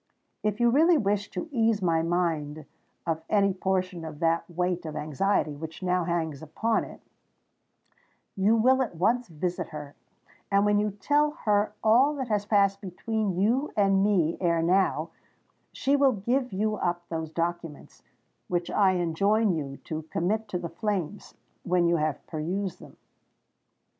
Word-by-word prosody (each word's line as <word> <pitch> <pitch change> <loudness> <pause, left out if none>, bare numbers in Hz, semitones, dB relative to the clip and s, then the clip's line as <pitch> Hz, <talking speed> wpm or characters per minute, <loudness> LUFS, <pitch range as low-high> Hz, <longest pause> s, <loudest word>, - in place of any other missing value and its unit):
If 210 +1 -1
you 240 0 +4
really 320 +6 +5
wish 205 -4 0
to 335 - -5
ease 225 -4 +2
my 165 -4 +1
mind 160 -3 -1 0.4
of 160 -1 -1
any 200 -2 +3
portion 185 -2 -2
of 155 -2 -7
that 165 +2 0
weight 180 +1 -1
of 155 -2 -6
anxiety 155 +2 0
which 160 +5 -8
now 180 -1 +1
hangs 160 -4 -2
upon 220 +8 -1
it, - - -12 1.3
you 200 +4 +3
will 260 +4 +4
at 235 -9 -2
once 230 +8 +1
visit 175 +2 -3
her; 150 -2 -8 0.6
and 200 0 +3
when 205 0 +3
you 210 0 +1
tell 290 +10 +1 0.2
her 210 0 +2
all 255 +7 +4
that 260 -4 -4
has 205 -1 0
passed 200 -2 +3
between 200 0 -2
you 245 +9 +1
and 195 -1 +3
me 180 -6 +2
ere 170 -2 +2
now, 185 +3 +1 0.6
she 280 +1 +1
will 275 -2 +4
give 245 +5 -1
you 215 +2 -1
up 175 -1 -2
those 160 -1 -3
documents, 165 -1 -4 0.5
which 175 -1 -2
I 195 -2 +3
enjoin 195 +5 +2
you 140 -4 -4
to 155 0 -4
commit 215 +6 -1
to 190 - -3
the 175 -1 -5
flames, 200 0 -4 0.3
when 180 -1 +1
you 170 0 +3
have 155 -2 -2
perused 175 +4 -3
them." - - -14
190 Hz, 160 wpm, -27 LUFS, 165-215 Hz, 1.3 s, really